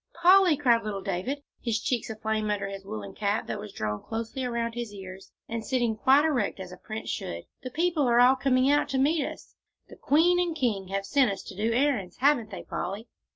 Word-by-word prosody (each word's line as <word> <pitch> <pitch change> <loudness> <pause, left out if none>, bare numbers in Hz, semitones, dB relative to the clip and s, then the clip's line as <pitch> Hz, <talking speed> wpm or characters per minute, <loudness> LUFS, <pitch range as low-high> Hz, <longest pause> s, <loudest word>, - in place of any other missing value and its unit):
"Polly," 360 -2 +6
cried 240 -5 +3
little 200 -2 -4
David, 205 +10 -3 0.2
his 230 -2 -1
cheeks 240 -1 -2
aflame 220 -1 -2
under 200 -1 -1
his 195 0 -7
woollen 105 - -7
cap 205 0 -1
that - - -4
was 210 0 -8
drawn 105 - -3
close 225 +2 -5
around 235 -3 -2
his 235 -2 -5
ears, 190 -1 -10 0.2
and 230 0 -4
sitting 240 -3 0
quite 270 +7 +4
erect 250 -11 0
as 185 -1 -7
a 180 - -10
prince 215 +4 -7
should, 85 0 -5 0.2
"the 255 - -6
people 325 0 +1
are 240 0 +4
all 250 +2 +7
coming 260 0 +2
out 290 +1 +3
to 270 - -1
meet 290 +3 +2
us - - -8 0.4
the - - -11
queen 335 +5 +3
and 345 -2 0
king 220 -10 -1
have 195 +1 -3
sent 270 -1 +3
us 195 - -6
to 190 - -10
do 215 +4 0
the 230 - +1
errands; 250 -10 0
haven't 260 -5 +3
they, 195 - -7
Polly?" 200 +6 -5
230 Hz, 220 wpm, -27 LUFS, 200-275 Hz, 0.4 s, all